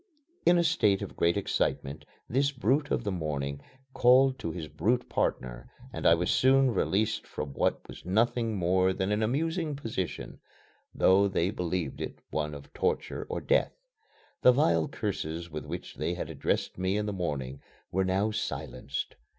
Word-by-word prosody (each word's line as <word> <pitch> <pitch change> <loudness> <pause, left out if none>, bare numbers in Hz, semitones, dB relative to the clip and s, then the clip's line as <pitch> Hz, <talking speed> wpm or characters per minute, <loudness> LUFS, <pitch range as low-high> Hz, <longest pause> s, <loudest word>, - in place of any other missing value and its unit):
In 175 - +7
a 170 - +3
state 105 - +2
of - - -8
great 85 +3 +2
excitement 75 -6 -1 0.2
this 140 +4 +1
brute 135 +3 +1
of - - 0
the 100 - -1
morning 70 -5 -3 0.3
called 130 +2 +5
to 85 - -3
his 80 -1 -5
brute 120 +10 0
partner 60 -1 -2 0.2
and - - 0
I 85 - +7
was 90 +1 0
soon 135 0 +4
released 110 0 0
from 70 -2 -5
what - - 0
was - - -11
nothing 115 +4 +1
more 95 0 +2
than 95 +2 -1
an 105 +1 +1
amusing 155 +6 0
position, 110 -9 -4 0.5
though 100 +2 +4
they 95 -1 0
believed 90 -6 -3
it - - -5
one 75 -1 -2
of 70 - -12
torture 460 0 -1
or - - -3
death. - - +2 0.7
The 125 - +8
vile 85 - +3
curses 80 +2 -4
with 75 0 -6
which 85 +3 -6
they - - -1
had - - -5
addressed - - -2
me 95 +2 +1
in 105 - -1
the 105 - -2
morning 70 -7 -3 0.3
were 95 +1 +1
now 95 +3 +1
silenced. 70 -9 -4
95 Hz, 165 wpm, -29 LUFS, 80-125 Hz, 0.7 s, The